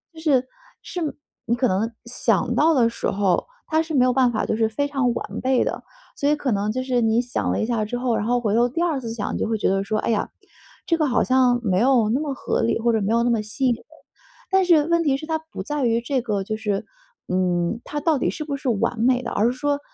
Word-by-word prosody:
就 320 Hz, -, -10 dB
是， 265 Hz, -5 st, +2 dB, 0.3 s
是 360 Hz, -, -6 dB
没 305 Hz, -3 st, -1 dB, 0.3 s
你 235 Hz, -, +1 dB
可 250 Hz, +2 st, +1 dB
能 215 Hz, +3 st, 0 dB
想 235 Hz, -, 0 dB
到 320 Hz, +2 st, +4 dB
的 240 Hz, -4 st, +4 dB
时 230 Hz, -, -3 dB
候， 195 Hz, -2 st, +1 dB, 0.2 s
它 315 Hz, 0 st, +2 dB
是 320 Hz, 0 st, -5 dB
没 250 Hz, -2 st, +5 dB
有 250 Hz, -, +2 dB
办 255 Hz, -2 st, +3 dB
法 220 Hz, -, -1 dB
就 -, -, -1 dB
是 225 Hz, 0 st, +1 dB
非 285 Hz, +6 st, -1 dB
常 270 Hz, -4 st, 0 dB
完 -, -, -5 dB
备 260 Hz, -1 st, +2 dB
的。 -, -, -3 dB, 0.3 s
所 285 Hz, -, 0 dB
以 300 Hz, -, +3 dB
可 280 Hz, -3 st, -2 dB
能 205 Hz, 0 st, 0 dB
就 255 Hz, -, -2 dB
是 250 Hz, -2 st, 0 dB
你 225 Hz, +1 st, +3 dB
想 245 Hz, 0 st, -2 dB
了 -, -, -1 dB
一 -, -, +1 dB
下 230 Hz, -2 st, 0 dB
之 245 Hz, +3 st, -3 dB
后， 245 Hz, -2 st, 0 dB
然 210 Hz, -, -1 dB
后 245 Hz, +2 st, +2 dB
回 215 Hz, -4 st, -1 dB
头 240 Hz, +1 st, +3 dB
第 330 Hz, +7 st, -3 dB
2 315 Hz, -6 st, 0 dB
次 230 Hz, -2 st, -5 dB
想， 210 Hz, -3 st, -3 dB
就 -, -, -1 dB
会 225 Hz, -, 0 dB
觉 -, -, 0 dB
得 195 Hz, +1 st, +1 dB
说： 215 Hz, +2 st, -1 dB
“哎 -, -, -2 dB
呀， 215 Hz, -, 0 dB, 0.6 s
这 335 Hz, -, +2 dB
个 310 Hz, -, +1 dB
好 245 Hz, -4 st, +2 dB
像 255 Hz, -2 st, +3 dB
没 190 Hz, -4 st, +1 dB
有 240 Hz, -2 st, +3 dB
那 250 Hz, -, +1 dB
么 290 Hz, -3 st, -2 dB
合 -, -, -1 dB
理， 230 Hz, -, +1 dB
或 235 Hz, +1 st, +2 dB
者 220 Hz, -, +1 dB
没 200 Hz, +2 st, 0 dB
有 235 Hz, 0 st, +3 dB
那 245 Hz, -, +2 dB
么 230 Hz, -2 st, +1 dB
吸 215 Hz, +6 st, -3 dB
引 245 Hz, -, +3 dB
人”。 -, -, -9 dB, 0.7 s
但 385 Hz, 0 st, +4 dB
是 320 Hz, -4 st, +5 dB
问 335 Hz, 0 st, +2 dB
题 275 Hz, -4 st, +2 dB
是 310 Hz, -, -8 dB
它 320 Hz, 0 st, -1 dB
不 315 Hz, -10 st, -9 dB
在 295 Hz, +5 st, -2 dB
于， 230 Hz, 0 st, +2 dB
这 255 Hz, +1 st, -1 dB
个 210 Hz, -5 st, -2 dB
就 215 Hz, +3 st, -3 dB
是 210 Hz, -3 st, -2 dB, 0.4 s
嗯， 180 Hz, +2 st, 0 dB
它 295 Hz, -, -4 dB
到 320 Hz, -2 st, +2 dB
底 -, -, +1 dB
是 305 Hz, -, -4 dB
不 285 Hz, -2 st, -3 dB
是 275 Hz, -, -6 dB
完 225 Hz, +1 st, 0 dB
美 250 Hz, +2 st, +3 dB
的。 -, -, -4 dB
而 210 Hz, -, +1 dB
是 -, -, -5 dB
说， 285 Hz, +2 st, -1 dB
245 Hz, 290 characters per minute, -23 LUFS, 220-280 Hz, 0.7 s, 没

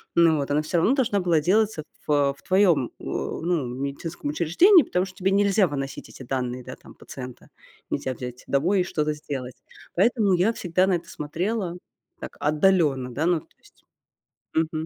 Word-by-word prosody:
ну 165 Hz, -2 st, +5 dB
вот, 140 Hz, -1 st, -3 dB
она 150 Hz, +1 st, +2 dB
всё 155 Hz, +3 st, -1 dB
равно 195 Hz, +9 st, +3 dB
должна 230 Hz, -7 st, +1 dB
была 170 Hz, -4 st, +2 dB
делаться 200 Hz, 0 st, +1 dB, 0.2 s
в, -, -, 0 dB
э, 140 Hz, -1 st, +3 dB
в -, -, -21 dB
твоём, 185 Hz, -, +3 dB
а, -, -, -15 dB
ну, 165 Hz, -4 st, -2 dB
медицинском 140 Hz, +5 st, -5 dB
учреждении, 250 Hz, -, +5 dB
потому 180 Hz, +1 st, -1 dB
что 185 Hz, -1 st, -12 dB
тебе 190 Hz, -1 st, +1 dB
нельзя 200 Hz, 0 st, +3 dB
выносить 135 Hz, -2 st, -5 dB
эти -, -, -11 dB
данные, 125 Hz, -1 st, -3 dB
да, 125 Hz, -, -8 dB
там -, -, -16 dB
пациента, 125 Hz, -2 st, -9 dB, 0.5 s
нельзя 130 Hz, -, -2 dB
взять 125 Hz, 0 st, -8 dB
домой 175 Hz, +8 st, +2 dB
и -, -, +2 dB
что-то 155 Hz, -4 st, -1 dB
сделать. 135 Hz, -4 st, -6 dB, 0.4 s
Поэтому 210 Hz, +1 st, +3 dB
я 185 Hz, +6 st, +2 dB
всегда 180 Hz, -2 st, +1 dB
на 190 Hz, -, +2 dB
это 170 Hz, -, -6 dB
смотрела 175 Hz, +5 st, -3 dB, 0.4 s
так -, -, -9 dB
отдалённо, 150 Hz, -5 st, +2 dB
да, 155 Hz, -, -1 dB
ну, 175 Hz, -1 st, +2 dB
то -, -, -25 dB
есть -, -, -25 dB, 0.7 s
Мгм. 160 Hz, 0 st, 0 dB
165 Hz, 180 wpm, -24 LUFS, 140-190 Hz, 0.7 s, ну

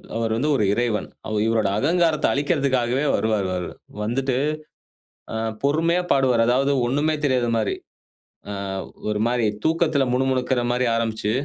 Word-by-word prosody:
அவரு 115 Hz, -1 st, -1 dB
வந்து 150 Hz, +5 st, 0 dB
ஒரு 110 Hz, -, +1 dB
இறைவன். 115 Hz, -1 st, -1 dB, 0.2 s
அவு 110 Hz, -1 st, -2 dB
இவருடைய 110 Hz, -3 st, +1 dB
அகங்காரத்தை 165 Hz, +2 st, +2 dB
அளிக்கற்துக்காகவே 140 Hz, -2 st, +1 dB
வருவாரு. 110 Hz, -3 st, 0 dB
வரு 90 Hz, -1 st, -3 dB, 0.3 s
வந்துட்டு 130 Hz, +4 st, -1 dB, 1.0 s
ஆ -, -, -3 dB, 0.3 s
பொறுமையா 165 Hz, +5 st, +2 dB
பாடுவாரு. 130 Hz, -4 st, +3 dB
அதாவது 135 Hz, +3 st, +2 dB
ஒன்னுமே 145 Hz, +5 st, +1 dB
தெரியாத 130 Hz, -4 st, +2 dB
மாதிரி. 110 Hz, -2 st, 0 dB, 0.7 s
ஆ -, -, -4 dB, 0.6 s
ஒரு 105 Hz, 0 st, -1 dB
மாதிரி 120 Hz, -1 st, +1 dB, 0.2 s
தூக்கத்தில 160 Hz, -3 st, +2 dB
முணு 130 Hz, +1 st, +1 dB
முணுக்கிற 130 Hz, -1 st, 0 dB
மாதிரி 125 Hz, +1 st, +1 dB
ஆரம்பிச்சு, 110 Hz, -2 st, -1 dB
125 Hz, 135 wpm, -23 LUFS, 115-145 Hz, 1.0 s, பாடுவாரு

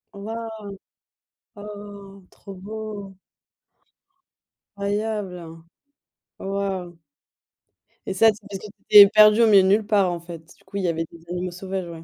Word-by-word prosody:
Waouh! 220 Hz, +1 st, -7 dB, 0.9 s
Oh, 205 Hz, -1 st, -11 dB
trop 195 Hz, -, -13 dB
beau. 205 Hz, 0 st, -8 dB, 1.6 s
Incroyable. 200 Hz, -5 st, -4 dB, 0.7 s
Oh -, -, -8 dB
waouh! 190 Hz, -4 st, -4 dB, 1.1 s
Et -, -, -3 dB
ça 225 Hz, +4 st, +4 dB
c'est 205 Hz, -, -17 dB
parce 195 Hz, -1 st, -6 dB
que -, -, -11 dB
tu 205 Hz, -, -10 dB, 0.2 s
t'étais 205 Hz, -1 st, +10 dB
perdu 215 Hz, +1 st, +6 dB
au -, -, +5 dB
milieu 200 Hz, -3 st, +7 dB
nulle 205 Hz, +3 st, +2 dB
part, 195 Hz, -4 st, +2 dB
en 175 Hz, -, -4 dB
fait, 170 Hz, -1 st, -10 dB, 0.2 s
du -, -, -27 dB
coup 190 Hz, -, -14 dB
il 195 Hz, -, -2 dB
y -, -, +1 dB
avait 165 Hz, 0 st, -2 dB
des 165 Hz, -1 st, -16 dB
animaux 180 Hz, 0 st, -3 dB
sauvages, 185 Hz, 0 st, -5 dB
ouais. 165 Hz, -1 st, -10 dB
200 Hz, 150 wpm, -23 LUFS, 180-210 Hz, 1.6 s, t'étais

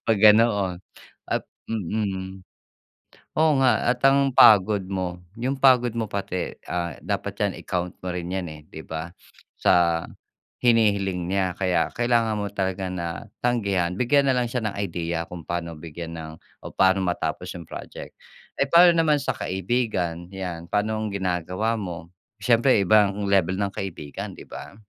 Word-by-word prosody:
'Pag 110 Hz, -2 st, +2 dB
ganoon 105 Hz, -3 st, +5 dB, 0.5 s
at -, -, -1 dB, 0.2 s
mm. 95 Hz, -2 st, -3 dB, 0.9 s
Oo 155 Hz, 0 st, +4 dB
nga, 125 Hz, -5 st, +3 dB
at 125 Hz, -, 0 dB
ang 140 Hz, 0 st, +4 dB
pagod 100 Hz, -1 st, +6 dB
mo, 95 Hz, -2 st, -3 dB, 0.2 s
yung 125 Hz, +4 st, -2 dB
pagod 125 Hz, -2 st, +5 dB
mo 115 Hz, -, 0 dB
pati, 100 Hz, -3 st, -3 dB, 0.2 s
ah, 85 Hz, -1 st, -2 dB
dapat -, -, -3 dB
yan -, -, +1 dB
i-count 90 Hz, -1 st, -3 dB
mo 90 Hz, -, -2 dB
rin 90 Hz, -1 st, -4 dB
yan, 95 Hz, -1 st, -2 dB
eh, 75 Hz, -1 st, -12 dB
di 80 Hz, -, -10 dB
ba? 80 Hz, +1 st, -5 dB, 0.5 s
Sa 85 Hz, -1 st, +3 dB, 0.6 s
hinihiling 100 Hz, -7 st, +2 dB
niya 95 Hz, -2 st, 0 dB
kaya, 90 Hz, -3 st, +1 dB
kailangan 115 Hz, -2 st, +1 dB
mo 100 Hz, -, -3 dB
talaga 95 Hz, -1 st, -2 dB
na 85 Hz, -2 st, -4 dB, 0.2 s
tanggihan. 100 Hz, -8 st, 0 dB
Bigyan 140 Hz, +7 st, +2 dB
na -, -, +2 dB
lang 120 Hz, -2 st, 0 dB
siya 120 Hz, -2 st, -2 dB
ng 105 Hz, -, -4 dB
idea 85 Hz, -2 st, -2 dB
kung 85 Hz, -3 st, -9 dB
paano 85 Hz, -2 st, -4 dB
bigyan 85 Hz, +1 st, -8 dB
ng 80 Hz, -1 st, -7 dB, 0.3 s
o -, -, -9 dB
paano 95 Hz, 0 st, +3 dB
matapos 90 Hz, 0 st, -2 dB
yung 85 Hz, -, -8 dB
project. -, -, -9 dB, 0.4 s
Eh, 140 Hz, -, +2 dB
paano 175 Hz, +3 st, +7 dB
naman 155 Hz, -3 st, +3 dB
sa -, -, -2 dB
kaibigan? 95 Hz, -4 st, -2 dB
Yan. 90 Hz, -3 st, -5 dB
Paano 105 Hz, +1 st, 0 dB
ang 110 Hz, -1 st, -3 dB
ginagawa 95 Hz, +3 st, -1 dB
mo? 85 Hz, -4 st, -6 dB, 0.3 s
Siyempre 120 Hz, 0 st, +4 dB
iba 105 Hz, +1 st, +5 dB
ang 100 Hz, +1 st, -4 dB
level 95 Hz, -2 st, +2 dB
ng 100 Hz, -, 0 dB
kaibigan, 85 Hz, -7 st, -6 dB
di -, -, -11 dB
ba? -, -, -9 dB
95 Hz, 160 wpm, -24 LUFS, 90-115 Hz, 0.9 s, paano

